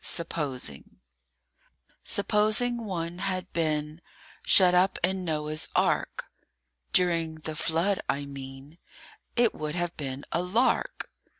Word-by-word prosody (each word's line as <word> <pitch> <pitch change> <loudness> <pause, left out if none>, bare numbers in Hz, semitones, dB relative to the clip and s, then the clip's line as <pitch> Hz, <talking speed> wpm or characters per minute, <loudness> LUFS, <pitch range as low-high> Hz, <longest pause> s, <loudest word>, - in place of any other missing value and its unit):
SUPPOSING 140 - -3 1.1
SUPPOSING 215 +4 +2
one 175 -3 -3
had 185 -1 -3
been 155 -1 -1 0.4
Shut 180 -2 +6
up 180 +2 +4
in 190 +1 +1
Noah's 155 -2 -1
Ark - - +1 0.7
(During 165 -3 +2
the 155 - -4
flood, 170 +6 +1
I 140 +1 0
mean) 135 +3 -10 0.6
It 240 -2 +4
would 155 +1 -4
have 175 -1 -2
been 135 -1 -5
a 170 - +1
lark! 235 - +1
170 Hz, 110 wpm, -28 LUFS, 150-185 Hz, 1.1 s, Shut